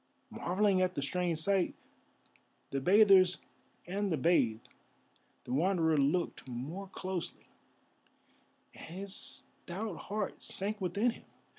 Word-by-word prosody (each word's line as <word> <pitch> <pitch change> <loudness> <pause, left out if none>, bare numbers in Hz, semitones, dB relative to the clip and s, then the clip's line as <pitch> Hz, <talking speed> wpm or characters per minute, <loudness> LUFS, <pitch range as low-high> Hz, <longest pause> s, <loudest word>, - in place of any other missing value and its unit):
Marvelling 190 +1 +1
at 185 0 +1
the 140 - -1
strange 175 +3 -1
sight, 190 +3 +3 1.0
the 135 - -1
bathers 190 0 +6 0.5
and 195 +2 -2
the 160 - +1
bathed, 125 -8 +2 0.8
the - - -5
Wanderer 165 +1 +2
looked 145 +2 0
more 145 +11 -6
closely, 185 -2 -5 1.3
and 165 - -10
his 195 0 -4
stout 195 +2 -4
heart 205 -1 -4
sank 210 +2 -2
within 200 +7 +1
him. - - -14
185 Hz, 115 wpm, -32 LUFS, 160-195 Hz, 1.3 s, bathers